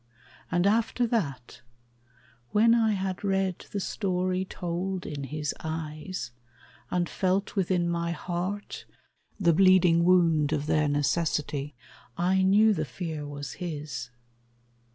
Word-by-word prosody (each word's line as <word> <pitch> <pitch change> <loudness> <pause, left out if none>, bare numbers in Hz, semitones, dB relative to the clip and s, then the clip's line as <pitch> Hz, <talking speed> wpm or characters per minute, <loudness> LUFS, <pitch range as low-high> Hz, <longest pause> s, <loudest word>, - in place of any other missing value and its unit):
And 175 0 +2
after 230 +3 +2
that, 145 - -3 0.9
when 230 +2 +5
I 225 -2 +3
had 190 -1 -3
read 195 -2 -1
the 205 - -2
story 185 -1 -1
Told 180 +1 -4
in 140 -2 -5
his 150 +2 -3
eyes, 160 -1 -5 0.6
and 175 -1 0
felt 190 +4 -1
within 180 -3 +1
my 170 0 -1
heart 180 +4 -4 0.5
The 170 -4 +4
bleeding 180 -1 +5
wound 165 -4 +4
of 150 -1 -1
their 150 0 +2
necessity, 145 -1 -1 0.4
I 185 +2 +2
knew 210 +3 +5
the - - -1
fear 160 -5 -5
was 145 -1 -6
his. 150 -7 -5
175 Hz, 120 wpm, -27 LUFS, 155-190 Hz, 0.9 s, when